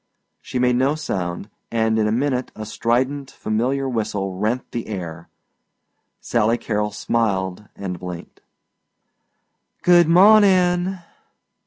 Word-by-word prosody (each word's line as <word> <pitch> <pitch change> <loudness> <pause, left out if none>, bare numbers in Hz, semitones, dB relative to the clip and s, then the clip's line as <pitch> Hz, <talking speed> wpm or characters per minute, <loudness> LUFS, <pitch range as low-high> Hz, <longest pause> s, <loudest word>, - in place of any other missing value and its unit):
See - - -5
made 125 0 +2
no 135 +4 +2
sound 95 - -4 0.2
and 110 -1 +1
in 105 - +2
a - - 0
minute 130 +1 -1
a 110 - -6
strident 130 +6 -1
familiar 130 +6 -1
whistle 105 -5 -2
rent 110 +6 -2
the 120 - -4
air. 85 -6 -6 0.9
Sally 115 0 +1
Carrol 105 -2 -2
smiled 105 -3 -1
and 90 -3 -5
blinked. 90 -1 -9 1.4
"Good 175 -2 +6
mawnin'." 185 -1 +5
115 Hz, 115 wpm, -21 LUFS, 105-140 Hz, 1.4 s, Good